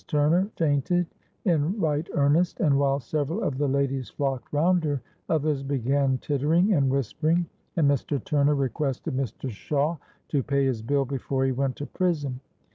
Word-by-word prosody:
Turner 165 +6 +2
fainted 165 +3 +1 0.4
in 170 +3 +1
right 155 -1 0
earnest, 160 - +2
and 145 -9 +3
while 140 0 +2
several 150 +4 -2
of 130 -2 -1
the 145 - +2
ladies 135 -1 0
flocked 135 -3 -3
round 170 +4 +3
her, 145 -3 0 0.3
others 150 -3 +1
began 135 0 +1
tittering 155 - +2
and 140 -6 +3
whispering, 155 +6 +1 0.3
and 160 -5 +3
Mr. 140 +1 +1
Turner 145 0 +2
requested 135 +1 -2
Mr. 130 0 -3
Shawe 145 +8 -1 0.3
to 145 - +1
pay 140 +1 +1
his 125 -5 0
bill 140 +4 +1
before 135 0 -1
he 135 - +2
went 130 0 -1
to 145 - -5
prison. 145 -9 -1
145 Hz, 160 wpm, -26 LUFS, 135-155 Hz, 0.4 s, and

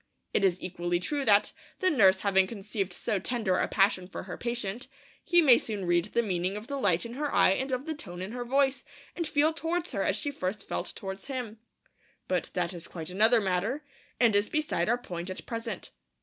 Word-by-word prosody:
It - - +2
is 185 -2 +3
equally 175 -1 -1
true 285 +10 -2
that, 205 -1 +5 0.3
the 370 - +2
nurse 190 -9 +5
having 190 -2 +3
conceived 200 -2 -3
so 195 +2 -1
tender 215 -2 0
a - - +1
passion 195 -2 +2
for 190 - -7
her 180 -1 -6
patient, 235 -1 -4 0.4
he 345 -1 +4
may 255 -5 +7
soon 205 -4 -4
read 175 0 +2
the 235 +3 0
meaning 185 -1 -1
of 210 - -7
the 280 +2 -4
light 180 -5 +2
in 235 - -7
her 290 +2 -2
eye - - +5
and 265 +7 -1
of 255 +2 -2
the 320 - -2
tone 175 - -8
in 185 +3 -5
her 245 0 -4
voice, 265 +1 +1 0.3
and 335 -2 -2
feel 305 +1 +2
towards 330 +2 -2
her 200 -6 -1
as 195 - +1
she 285 +7 -2
first 200 -5 -4
felt - - -3
towards 195 +1 -6
him. 245 -5 -5 0.7
But 180 -1 0
that 180 0 0
is 170 -1 -8
quite 165 0 -7
another 220 +5 +5
matter, 200 +9 -1 0.4
and 230 -4 +4
is 205 +2 +3
beside 305 -6 0
our 240 - +3
point 175 -6 -6
at 185 - -6
present. 230 -1 -5
210 Hz, 215 wpm, -29 LUFS, 185-260 Hz, 0.7 s, may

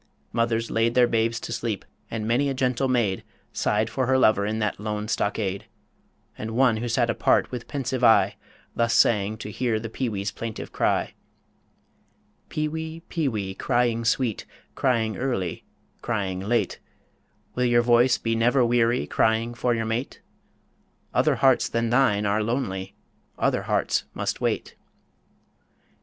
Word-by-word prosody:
Mothers 115 0 0
laid 115 +1 +1
Their 125 -1 +6
babes 115 0 0
to 115 - -5
sleep, 115 -4 -3 0.2
and 110 -1 -4
many 130 +5 +2
a 135 - -2
gentle 130 0 0
maid 115 -7 0 0.3
Sighed 105 +1 +1
for 130 +2 -2
her 130 0 +3
lover 105 -5 +3
in 110 +1 -1
that 105 -1 -1
lone 105 0 -3
stockade; 100 -3 -1 0.7
And 110 +1 -5
one 125 -3 +4
who 120 +2 -3
sat 120 0 +2
apart, - - +2
with 125 -2 -6
pensive 130 -3 -3
eye, 105 -4 +5 0.4
Thus 115 0 +1
sang 105 -1 +3
to 105 -1 -7
hear 115 0 0
the 115 0 -7
peewee's 105 -6 -2
plaintive 115 -2 -6
cry - - 0 1.4
_Peewee, 160 +1 -4
peewee, 110 - -2
crying 120 +2 0
sweet, 115 -1 0 0.3
Crying 115 -4 0
early, 120 -10 -2 0.4
crying 100 -5 -2
late 110 +5 -1 0.7
Will 125 - 0
your 120 -1 +4
voice 120 +1 +4
be 115 - -1
never 120 +3 +3
weary 120 0 +2
Crying 115 +1 +1
for 120 0 0
your 115 -1 -2
mate? 115 +4 -3 0.9
Other - - +3
hearts 135 -2 +3
than 115 0 -1
thine 115 -5 +3
are 105 +1 +1
lonely, 105 -5 -3 0.4
Other - - +1
hearts - - 0
must - - -3
wait. - - -2
115 Hz, 145 wpm, -25 LUFS, 110-125 Hz, 1.4 s, Their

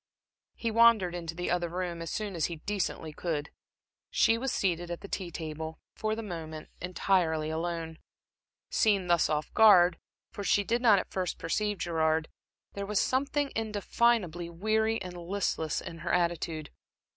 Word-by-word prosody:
He 230 - -2
wandered 225 -5 +5
into 165 -2 -5
the 180 +1 -2
other 175 -1 0
room 175 -1 -3
as 165 - -4
soon 210 -2 -3
as 165 - +1
he 170 - -3
decently 165 -3 -3
could. 150 -3 -3 0.6
She 225 - +4
was 255 +2 -2
seated 175 -2 0
at 175 - -5
the - - -8
tea 185 -2 -4
table, 160 -1 -5 0.2
for 215 0 -1
the 225 - -5
moment, 160 -5 -7
entirely 175 -4 +1
alone. 165 0 -3 0.7
Seen 200 -4 +3
thus 175 -1 +3
off 150 0 -2
guard, 185 -6 +7 0.3
for 200 - -6
she 205 +1 +3
did 235 +4 0
not 220 -5 +6
at - - -3
first 185 -2 -2
perceive 210 +4 -1
Gerard, 160 -2 0 0.4
there 200 0 -4
was 210 -1 +1
something 280 +2 0
indefinably 210 -5 +1
weary 220 +5 +1
and 180 -1 -7
listless 175 -3 -1
in 165 - -8
her 170 +1 -3
attitude. 170 -3 -1
175 Hz, 160 wpm, -30 LUFS, 165-210 Hz, 0.7 s, guard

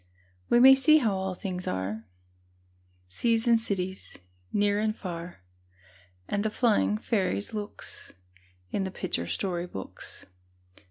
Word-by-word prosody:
We 240 - +5
may 265 +2 +10
see 305 +4 +6
how 230 -9 +2
all 190 -1 -2
things 185 -1 -5
are, 100 +4 -3 1.0
Seas 230 - +1
and 230 -1 +5
cities, 190 -4 -3 0.3
near 205 0 +2
and 215 0 0
far, 170 - -7 0.8
And 205 0 -1
the 220 - +1
flying 215 -2 +2
fairies' 190 - -1
looks, 210 -1 -7 0.6
In 195 - 0
the 190 - -2
picture 85 - -3
story 180 - -2
books. 95 - -8
200 Hz, 125 wpm, -28 LUFS, 180-220 Hz, 1.0 s, may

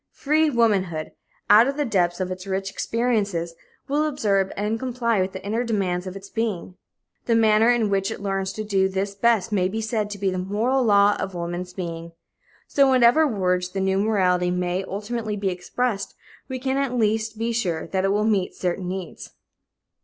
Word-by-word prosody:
Free 310 +2 +2
womanhood, 195 - +1 0.4
out 215 +4 +7
of 275 +1 -2
the 295 - 0
depths 175 -6 +1
of 185 -1 -2
its 185 +1 -6
rich 195 0 -2
experiences, 205 -9 -1 0.3
will 295 +2 +1
observe 200 -9 0
and 210 +3 -1
comply 235 -4 0
with 190 +1 -2
the 190 +1 -8
inner 225 +4 -1
demands 190 -6 -1
of 185 - -6
its 195 0 -9
being. 215 -5 -3 0.5
The 230 - +3
manner 220 0 +4
in 240 -3 +3
which 195 -1 +1
it - - -5
learns 195 -1 -2
to 215 - -4
do 195 -2 +1
this 195 +1 -2
best 220 -1 +1
may 185 -3 +2
be 215 +4 -3
said 220 -1 -2
to 205 - -6
be 195 -1 0
the 185 - -2
moral 220 +8 0
law 205 -2 +5
of 195 -1 -4
woman's 175 +1 -4
being. 170 -2 -6 0.5
So, 280 - +4
in - - +3
whatever 260 +5 +5
words 180 -6 0
the 195 - -4
new 190 0 +1
morality 185 -4 +2
may 180 +1 -1
ultimately 215 +2 -4
be 200 -1 -1
expressed, 195 +4 -3 0.3
we 260 - -3
can 265 +1 -1
at 275 -3 -1
least 220 0 0
be 230 +1 -1
sure 180 -9 -1
that 190 -1 -2
it 195 - +2
will 210 +1 +1
meet 200 -4 0
certain 180 0 -2
needs. 185 -2 -6
200 Hz, 195 wpm, -23 LUFS, 185-230 Hz, 0.5 s, out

